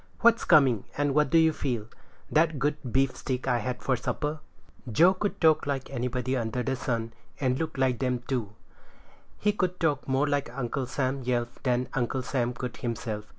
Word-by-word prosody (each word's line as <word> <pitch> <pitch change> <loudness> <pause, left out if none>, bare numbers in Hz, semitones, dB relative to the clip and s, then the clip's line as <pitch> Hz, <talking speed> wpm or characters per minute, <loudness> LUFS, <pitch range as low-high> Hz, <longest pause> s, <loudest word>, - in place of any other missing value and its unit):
"What's 230 0 +5
coming, 135 - +5
and 145 -1 +1
what 150 0 +3
do 165 - +4
you 160 -1 +5
feel?" 120 -8 -2 0.5
"That 160 0 +3
good 145 +3 +1 0.2
beefsteak 130 0 0
I 125 -2 +2
had 125 0 -4
for 130 - +2
supper." 150 +5 -2 0.5
Joe 170 - +6
could 200 +2 -3
talk 160 -3 +4
like 135 -2 -2
anybody 125 0 -1
under 120 0 -1
heaven, 120 -3 -2 0.3
and 130 -2 +1
look 160 -3 -3
like 130 -2 +1
them 125 -2 -1
too. 115 -6 -2 0.8
He 210 - +2
could 185 -3 -1
talk 150 -4 0
more 135 +2 +2
like 145 -2 0
Uncle 130 0 -2
Sam 135 +1 -1
Yelf 120 -1 -2
than 125 -1 +1
Uncle 130 0 -1
Sam 125 -2 0
could 125 0 -6
himself. 110 -3 -4
130 Hz, 175 wpm, -28 LUFS, 125-150 Hz, 0.8 s, Joe